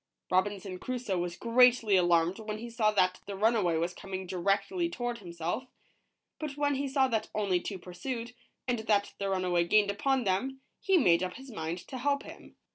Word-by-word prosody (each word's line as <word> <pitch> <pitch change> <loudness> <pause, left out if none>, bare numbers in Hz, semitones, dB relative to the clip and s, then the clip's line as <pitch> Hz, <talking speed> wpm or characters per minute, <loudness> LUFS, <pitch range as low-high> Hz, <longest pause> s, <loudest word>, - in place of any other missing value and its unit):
Robinson 185 0 0
Crusoe 245 -7 -2
was 175 0 -3
greatly 235 -3 +5
alarmed 175 +1 +3
when 215 -1 -4
he 235 +2 -7
saw 225 -2 +2
that 185 -3 +2
the 200 - -4
runaway 205 -5 +2
was 170 +2 -1
coming 190 0 -6
directly 200 - 0
toward 240 -7 -3
himself, 175 +6 -4 0.7
but 300 -2 -5
when 290 0 +2
he 275 +1 -1
saw 270 0 +3
that 225 -4 -1
only 195 -4 +1
two 195 - -5
pursued, 230 +7 -6 0.3
and 245 -2 +1
that 210 -2 +1
the 200 -1 -1
runaway 180 -2 +1
gained 205 +3 +3
upon 265 +5 +1
them, 245 +8 -1 0.2
he 385 -2 +3
made 175 - +4
up 180 -1 -3
his 265 0 -10
mind 165 -4 -3
to 260 - -6
help 280 +2 +1
him. - - -12
205 Hz, 185 wpm, -30 LUFS, 185-250 Hz, 0.7 s, greatly